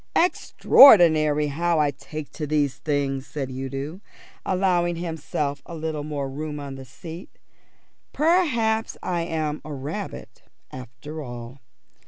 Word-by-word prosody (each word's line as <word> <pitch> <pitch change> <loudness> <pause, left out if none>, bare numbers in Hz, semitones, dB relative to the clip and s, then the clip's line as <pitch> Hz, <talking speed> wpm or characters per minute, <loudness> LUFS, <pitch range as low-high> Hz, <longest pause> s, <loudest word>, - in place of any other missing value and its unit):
"Extraordinary 160 - +6
how 165 +4 0
I 145 -1 +2
take 150 +2 -8
to 150 - -5
these 145 -3 0
things," 140 -3 -2
said 135 -3 -5
Udo, 135 +7 -5 0.4
allowing 180 -2 +1
himself 160 -4 -3
a 170 - -7
little 155 -2 -3
more 145 -2 -3
room 150 +2 -5
on 140 -1 -6
the 135 0 -9
seat. 165 +7 -11 0.7
"Perhaps 265 -10 +1
I 175 -2 -1
am 155 -2 -2
a 155 - -8
rabbit 150 +9 -6 0.3
after 130 +5 -8
all. 120 0 -8
150 Hz, 125 wpm, -24 LUFS, 140-175 Hz, 0.7 s, Extraordinary